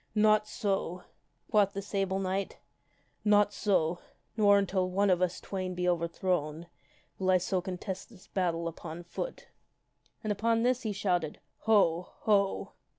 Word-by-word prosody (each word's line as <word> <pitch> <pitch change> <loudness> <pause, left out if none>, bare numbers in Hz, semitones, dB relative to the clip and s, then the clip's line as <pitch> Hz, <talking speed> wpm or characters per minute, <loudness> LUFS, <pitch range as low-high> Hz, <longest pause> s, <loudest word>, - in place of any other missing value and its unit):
" - - -41
Not 215 0 +3
so," 195 -5 -2 0.5
quoth 200 -2 +4
the 200 - -3
Sable 195 -1 -1
Knight 195 +1 -2 0.4
" - - -38 0.3
not 205 -1 +4
so, 175 -5 +1 0.4
nor 205 -2 +6
until 190 -2 +1
one 195 +2 +2
of 180 0 +2
us 180 -1 0
twain 185 -2 -4
be 180 0 -1
overthrown 170 -2 -1 0.5
will 190 -1 0
I 185 - +6
so 185 +1 -1
contest 190 +2 -5
this 205 -6 -16
battle 170 -3 -1
upon 165 +1 -7
foot." - - -6 0.7
And 215 - -1
upon 230 +2 +1
this 250 0 +2
he 220 - -2
shouted, 180 -6 -1
" - - -48
Ho! 180 -5 +4
Ho 200 -2 +2
190 Hz, 155 wpm, -30 LUFS, 180-205 Hz, 0.7 s, nor